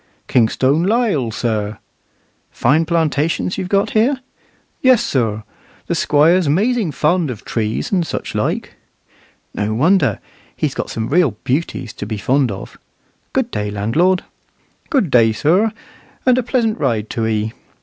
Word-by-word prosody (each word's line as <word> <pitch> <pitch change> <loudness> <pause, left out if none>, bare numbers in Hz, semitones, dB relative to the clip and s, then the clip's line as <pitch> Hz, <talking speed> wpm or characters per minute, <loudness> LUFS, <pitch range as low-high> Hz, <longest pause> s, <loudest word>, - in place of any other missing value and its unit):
"Kingstone 130 +5 +2
Lisle, 195 - +1
sir." 110 -2 -2 0.7
"Fine 160 +2 +2
plantations 165 +2 0
you've 185 -1 -4
got 200 0 +1
here?" 250 +5 +2 0.6
"Yes, 255 -3 +4
sir; 110 - -1 0.4
the - - -2
Squire's 160 +3 +3
'mazing 210 - +1
fond 155 +3 +1
of 120 -5 -7
trees 110 - -2
and 185 -4 +2
such - - -5
like." - - -2 0.8
"No 105 +1 -2
wonder. 145 - +3 0.4
He's - - -1
got - - -4
some 110 0 -3
real 150 - +2
beauties 130 -4 -2
to 105 - -7
be 110 -1 -3
fond 130 +4 +1
of. 95 - -9 0.5
Good - - -1
day, 105 0 -2
landlord." 115 - +1 0.7
"Good 255 - +1
day, 115 -3 +5
sir, 180 - +2 0.5
and 255 -1 +5
a - - +2
pleasant 230 -2 0
ride 115 -5 0
to 115 -1 -1
'ee." 110 0 -1
145 Hz, 140 wpm, -18 LUFS, 110-190 Hz, 0.8 s, day